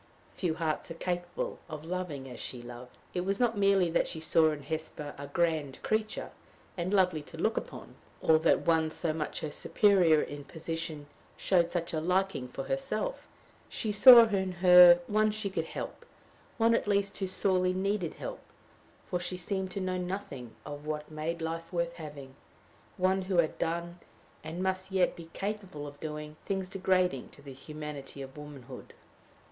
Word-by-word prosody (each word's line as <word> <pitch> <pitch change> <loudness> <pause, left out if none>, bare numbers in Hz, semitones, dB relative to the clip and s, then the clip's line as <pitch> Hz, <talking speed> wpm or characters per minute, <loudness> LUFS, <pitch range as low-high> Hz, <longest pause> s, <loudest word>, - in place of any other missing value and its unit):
Few 170 -4 -1
hearts 160 -1 -2
are 165 - -6
capable 175 -1 -3
of 155 0 -7
loving 170 -6 -4
as 125 -2 -9
she 125 -2 -5
loved. 120 +1 -10 0.2
It 180 - -1
was 195 +2 -1
not 240 -2 +2
merely 195 -2 +4
that - - +2
she 160 - -4
saw 160 0 +4
in 150 -2 -4
Hesper 150 -1 -5
a 140 0 -8
grand 155 -3 0
creature, 215 0 -1 0.4
and 175 +1 -2
lovely 180 -6 +3
to 160 +3 -11
look 220 +7 +1
upon, - - -6 0.3
or 160 -1 +4
that 160 - +3
one 160 -1 +3
so 160 0 -2
much 155 -1 -4
her 155 - -4
superior 180 -4 +4
in 145 -1 -4
position 160 -1 -5 0.3
showed 175 -3 +2
such 170 -2 -2
a 155 - 0
liking 185 -5 0
for 135 +2 -6
herself; 275 - -2 0.4
she 215 - -2
saw 235 +3 +10
in 190 -4 -1
her 180 -1 +8
one 215 +2 +2
she 210 -2 -3
could - - -2
help, - - -6 0.5
one 230 0 +4
at 230 - +1
least 200 -1 +1
who 190 - -1
sorely 185 -1 +2
needed 190 -2 -1
help, - - -6 0.7
for 180 - -2
she 180 +1 -3
seemed 190 +1 -2
to 195 - -4
know 185 -1 -1
nothing 175 - -5
of 145 0 -7
what 150 0 -4
made 160 +2 -3
life 165 +1 -4
worth 170 -1 -1
having 145 -5 -9 0.6
one 185 +1 +2
who 185 -1 -1
had 165 -2 +2
done, 170 +1 -2 0.4
and 170 +3 -4
must 190 0 -2
yet 190 -2 +2
be 165 -1 -11
capable 195 -7 -4
of 145 0 -10
doing, 150 0 -6
things 190 -2 -2
degrading 185 -7 +1
to 140 - -17
the 140 -2 -9
humanity 145 0 -7
of 135 0 -11
womanhood. 145 -4 -10
170 Hz, 175 wpm, -30 LUFS, 150-190 Hz, 0.7 s, saw